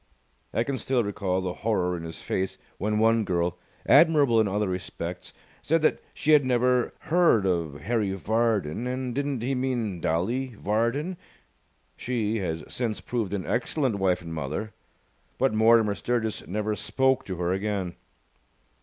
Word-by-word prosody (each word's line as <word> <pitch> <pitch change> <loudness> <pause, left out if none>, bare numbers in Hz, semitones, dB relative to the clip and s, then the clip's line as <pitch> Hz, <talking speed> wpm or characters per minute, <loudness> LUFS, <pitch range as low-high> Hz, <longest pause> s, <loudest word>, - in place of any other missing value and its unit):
I 115 - +1
can 135 +2 -2
still 130 -1 +1
recall 95 -2 -1
the 90 -1 -3
horror 90 -5 +1
in 85 - -5
his 80 - -8
face 95 0 -2 0.2
when 105 +2 0
one 115 +1 +4
girl, 90 -2 -1 0.3
admirable 145 -6 +5
in 110 - +1
other 105 +1 0
respects, 90 -1 -5 0.3
said 165 0 +1
that - - +3
she 155 - 0
had 150 -2 +7
never 125 -1 +2
heard 165 - +3
of 85 -6 -1
Harry 105 +2 0
Vardon, 110 -1 0
and 125 -1 -3
didn't 140 -2 -2
he 135 +3 0
mean 120 -8 -1
Dolly 115 +10 -1
Vardon? 120 - -1 0.8
She 115 -3 -1
has 80 -4 -3
since 115 -4 -2
proved 110 -5 -2
an 95 - -4
excellent 125 -1 0
wife 90 -2 +1
and 85 -1 -7
mother, 80 +8 -4 0.6
but 135 -4 +2
Mortimer 110 -1 +5
Sturgis 110 0 -2
never 105 +3 -1
spoke 130 +3 +1
to 95 - -4
her 90 +1 0
again. 95 -2 -2
110 Hz, 155 wpm, -26 LUFS, 95-125 Hz, 0.8 s, had